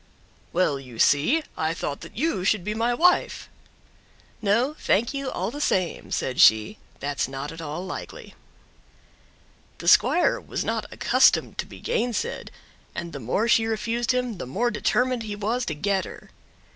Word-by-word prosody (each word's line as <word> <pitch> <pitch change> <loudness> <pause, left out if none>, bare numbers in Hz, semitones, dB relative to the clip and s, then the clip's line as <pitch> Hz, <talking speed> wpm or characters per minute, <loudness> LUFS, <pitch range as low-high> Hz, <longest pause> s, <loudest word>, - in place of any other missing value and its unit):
"Well, 165 -6 +1
you 125 -4 -12
see, 160 - +3
I 160 +1 -1
thought 145 -4 -4
that - - -11
you 300 - 0
should 205 -1 +1
be 210 +3 -2
my 230 +2 0
wife!" 350 +9 +2 0.9
"No, 230 +7 +2
thank 230 +7 +1
you 275 -1 -3
all - - -3
the 290 +3 -6
same," 185 - 0
said 130 - 0
she, 110 - +5 0.2
"that's 140 -1 -2
not 135 +2 -6
at 165 0 -9
all 160 +4 -5
likely." - - -8 1.4
The - - -8
squire 355 - +4
was - - -4
not - - -3
accustomed - - +3
to - - -2
be - - -12
gainsaid, 250 - -2 0.5
and 170 0 -5
the 140 - -5
more 130 - 0
she 225 -1 +4
refused 230 +2 -1
him 250 -6 -2
the 130 - -5
more 235 - 0
determined 250 +3 +1
he 210 -2 -5
was 225 +4 -2
to 155 - -2
get 195 +4 0
her. - - -12
210 Hz, 165 wpm, -25 LUFS, 160-240 Hz, 1.4 s, she